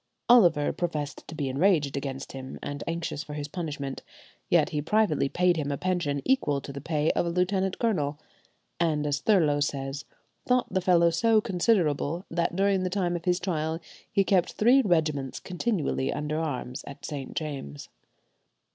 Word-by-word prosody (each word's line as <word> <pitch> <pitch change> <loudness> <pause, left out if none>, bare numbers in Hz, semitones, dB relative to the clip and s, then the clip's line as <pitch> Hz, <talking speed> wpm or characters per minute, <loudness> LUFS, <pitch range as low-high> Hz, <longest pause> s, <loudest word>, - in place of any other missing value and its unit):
Oliver 175 -12 +5
professed 150 -5 -4
to 160 - -8
be 145 -3 -2
enraged 145 0 +2
against 135 -1 -4
him, 130 -1 -7
and 145 0 -4
anxious 165 -3 -3
for 150 -1 -8
his 145 -1 -4
punishment, 145 -4 -5 0.5
yet - - +4
he 150 - -2
privately 165 -5 +2
paid 180 +1 +2
him 145 -2 -2
a 140 - -2
pension 170 -6 -1
equal 150 - +2
to 140 0 -8
the 140 - -6
pay 155 0 +1
of 175 - 0
a - - 0
lieutenant 185 +2 0
colonel, 150 -11 0 0.6
and, 155 -3 +1
as 145 0 -1
Thurloe 160 -9 +3
says, 140 -1 -2 0.4
"thought 250 0 +1
the 190 - +1
fellow 170 -2 +4
so 220 +6 +3
considerable, 180 -6 +1
that 170 0 0
during 195 0 +2
the 185 - -1
time 180 -2 0
of 170 - -5
his 180 0 +2
trial 160 -3 -2 0.3
he 195 - +3
kept 185 -2 +2
three 245 +5 +5
regiments 155 - 0
continually 180 - -1
under 150 +1 -2
arms 130 -5 -4
at 140 0 -9
St. 140 -3 -6
James'." 140 - -5
160 Hz, 170 wpm, -27 LUFS, 145-185 Hz, 0.6 s, Oliver